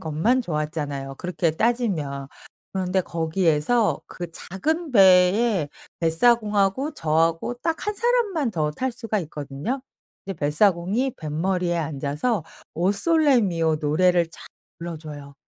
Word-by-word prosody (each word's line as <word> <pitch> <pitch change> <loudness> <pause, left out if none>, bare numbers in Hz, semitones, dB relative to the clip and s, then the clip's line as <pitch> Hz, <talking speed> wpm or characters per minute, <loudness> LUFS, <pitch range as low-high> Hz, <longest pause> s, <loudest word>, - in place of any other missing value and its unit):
것만 170 +12 +1
좋았잖아요 150 -5 -3
그렇게 175 0 -1
따지면. 160 - -1 0.4
그런데 190 0 0
거기에서 165 +5 +1
그 175 -2 -7
작은 310 - -3
배에 190 -2 +5 0.3
뱃사공하고 210 - +2
저하고 165 - 0
딱 330 +3 -2
한 420 - -1
사람만 425 - +1
더 155 -6 -1
탈 255 +11 -3
수가 225 -2 -2
있거든요. 150 - -5 0.5
이제 195 - -4
뱃사공이 185 - +1
뱃머리에 175 +3 -1
앉아서 155 - -2 0.3
오 180 +4 +2
솔레 300 +2 +3
미오 165 -6 +1
노래를 170 +4 +2
촥 - - -26 0.5
불러줘요. 150 -4 -8
180 Hz, 280 characters per minute, -24 LUFS, 155-230 Hz, 0.5 s, 배에